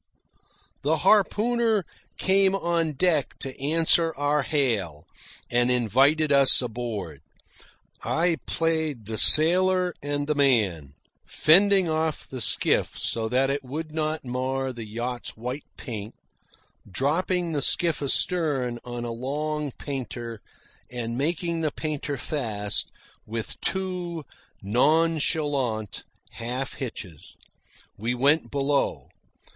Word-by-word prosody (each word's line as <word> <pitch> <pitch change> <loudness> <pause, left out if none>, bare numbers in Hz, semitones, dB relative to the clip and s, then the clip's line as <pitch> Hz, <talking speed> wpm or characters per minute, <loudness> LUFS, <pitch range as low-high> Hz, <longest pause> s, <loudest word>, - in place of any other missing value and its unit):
The 155 +3 +1
harpooner 215 +1 +3 0.3
came 195 0 +3
on 170 -4 0
deck 155 -1 +1
to 135 -1 -5
answer 165 +2 +3
our 145 +1 +1
hail, 110 - -1 0.4
and 120 +1 +2
invited 135 +6 +3
us 140 -1 +6
aboard. 110 - -4 0.8
I 170 0 +1
played 160 -7 -1
the 110 0 -3
sailor 180 +3 +5
and 145 0 -2
the 150 - +1
man, 105 - +1 0.3
fending 195 +3 +4
off 160 -1 -1
the 130 -2 -6
skiff - - +1
so 110 -1 -1
that 130 +3 +2
it 140 0 -2
would 155 +5 -5
not 155 -1 -2
mar 130 +1 -2
the 115 -2 -7
yacht's 120 +3 -5
white 125 +5 -5
paint, 110 -3 -7 0.7
dropping 170 - 0
the 145 -3 -1
skiff 165 +3 +2
astern 140 -4 0
on 120 -1 -5
a 120 - -4
long 150 +5 -3
painter, 120 -5 -6 0.5
and 120 -2 -4
making 165 +4 -1
the 155 - +1
painter 150 -2 -4
fast 110 -10 -2 0.4
with 110 0 -5
two 180 -4 -3 0.4
nonchalant 145 - +1 0.3
half 125 +3 -4
hitches. 95 - -8 0.6
We 115 +4 -2
went 145 +5 +2
below. 140 0 -1
140 Hz, 110 wpm, -25 LUFS, 120-160 Hz, 0.8 s, us